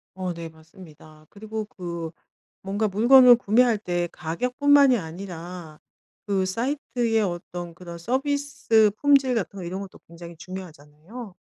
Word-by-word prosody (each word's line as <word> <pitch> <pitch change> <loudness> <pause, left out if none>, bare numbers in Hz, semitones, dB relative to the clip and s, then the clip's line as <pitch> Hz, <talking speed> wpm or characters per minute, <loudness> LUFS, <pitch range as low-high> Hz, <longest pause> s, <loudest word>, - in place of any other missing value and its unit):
어 185 -1 -3
네. 165 -1 -7
맞습니다. 160 -1 -17
그리고 220 +1 -6
그 170 -5 -6 0.5
뭔가 205 +3 -1
물건을 245 +5 +7
구매할 235 +1 +3
때 175 -4 -2
가격뿐만이 250 - +3
아니라 175 -2 -8 0.5
그 195 -2 +1
사이트의 235 +1 -1
어떤 175 -2 -5
그런 170 0 -10
서비스 265 - +1
품질 275 -2 +3
같은 200 -3 -3
거 - - -6
이런 185 +3 -5
것도 195 - -11
굉장히 170 0 -11
중요하잖아요. 185 - -10
190 Hz, 300 characters per minute, -24 LUFS, 170-235 Hz, 0.5 s, 물건을